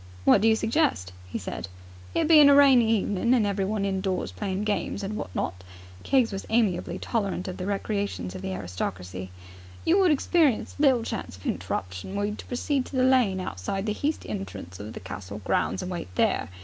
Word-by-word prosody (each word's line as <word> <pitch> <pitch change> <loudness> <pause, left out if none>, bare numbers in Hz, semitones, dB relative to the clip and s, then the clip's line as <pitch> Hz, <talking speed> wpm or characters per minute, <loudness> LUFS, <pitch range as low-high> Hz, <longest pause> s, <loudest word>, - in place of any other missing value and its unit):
"What 195 - +6
do 225 - +4
you 220 - +5
suggest?" 220 - 0
he - - -4
said. - - -5 0.5
"It - - +2
being 305 -3 +8
a 280 - +7
rainy 265 -5 +6
evening 205 +5 +1
and 225 -4 +3
everyone 200 +1 -1
indoors 190 -1 -1
playing 195 -1 -3
games 210 -1 -2
and 200 +2 -3
what 95 - -4
not," 90 +3 -3 0.4
Keggs 255 - +2
was 195 -1 -4
amiably 195 -6 +1
tolerant 200 -5 -2
of 185 - -5
the 185 - -4
recreations 200 - -2
of 95 - -7
the 95 - -4
aristocracy 90 0 -5 0.6
"you 360 +4 +4
would 375 -2 +5
experience 300 -3 +2
little 265 -5 +4
chance 225 - -5
of 95 - -16
a - - +1
hinterruption, 90 - -4
were 205 0 0
you 210 - -2
to - - -9
proceed 265 +2 -1
to - - -8
the 255 - +3
lane 250 -8 +3
outside 185 - -4
the 210 - 0
heast 295 +8 -2
entrance 95 -3 -6
of 105 +2 -7
the - - -7
castle 95 +2 -7
grounds - - 0
and 185 - -5
wait 175 -2 -4
there. - - +1
200 Hz, 200 wpm, -26 LUFS, -, 0.6 s, being